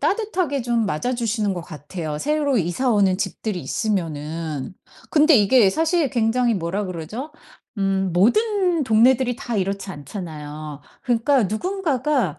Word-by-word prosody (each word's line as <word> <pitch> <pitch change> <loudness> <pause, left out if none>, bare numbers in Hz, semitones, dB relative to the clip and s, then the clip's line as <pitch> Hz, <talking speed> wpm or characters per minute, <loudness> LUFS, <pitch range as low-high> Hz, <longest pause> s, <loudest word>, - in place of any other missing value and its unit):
따뜻하게 365 - 0
좀 235 -2 0
맞아 220 +10 -1
주시는 220 -4 -1
것 180 - -4
같아요. 155 -1 -6
새로 290 - 0
이사 190 +8 0
오는 195 -3 +3
집들이 205 -2 -3
있으면은. 160 - -3 0.4
근데 310 0 +5
이게 210 0 +5
사실 320 - +1
굉장히 235 0 +1
뭐라 190 +2 -2
그러죠? 185 - -6 0.5
음 195 -1 0
모든 360 - +2
동네들이 245 +2 +3
다 240 -4 -4
이렇지 195 0 -2
않잖아요. 150 -2 -7 0.2
그러니까 250 +2 +2
누군가가 270 - -1
220 Hz, 310 characters per minute, -22 LUFS, 180-265 Hz, 0.5 s, 근데